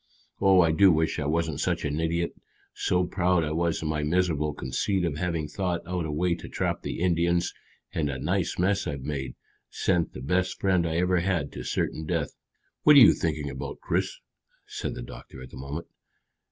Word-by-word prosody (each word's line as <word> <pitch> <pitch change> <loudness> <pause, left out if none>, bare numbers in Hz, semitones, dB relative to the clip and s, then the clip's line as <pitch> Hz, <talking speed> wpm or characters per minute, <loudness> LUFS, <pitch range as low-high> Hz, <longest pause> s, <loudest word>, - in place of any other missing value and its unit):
Oh, 95 -2 +6
I 85 -2 +4
do 95 +4 +6
wish 80 -1 +1
I 75 - -1
wasn't 80 -1 0
such - - 0
an 75 +1 -1
idiot! 85 +1 0 0.4
So 90 0 +1
proud 90 -1 +1
I 75 - -2
was 85 0 0
in - - -2
my 75 -1 -1
miserable 75 -1 +1
conceit 85 +10 -1
of 75 -4 -2
having 85 -2 -1
thought 90 +1 -2
out 90 -2 -2
a - - -3
way 85 +4 +1
to 85 - -7
trap - - -2
the - - -4
Indians, 85 0 +2 0.4
and 75 -3 0
a 70 - -3
nice 85 +6 -1
mess 95 +3 +1
I've 70 -3 -4
made 70 -3 -4 0.3
sent 90 -3 0
the 65 - -8
best 90 +7 0
friend 90 -3 +2
I 80 - -2
ever 90 +1 +2
had 85 -5 -1
to - - -7
certain 80 0 -2
death." 80 -4 -1 0.5
"What 150 - +7
are - - +11
you 120 - +9
thinking 75 -3 -2
about, 65 - -6
Chris?" - - -1 0.5
said - - -5
the - - -6
doctor 65 +2 -11
at 65 - -11
that - - -10
moment. 70 +5 -5
85 Hz, 200 wpm, -27 LUFS, 75-90 Hz, 0.5 s, are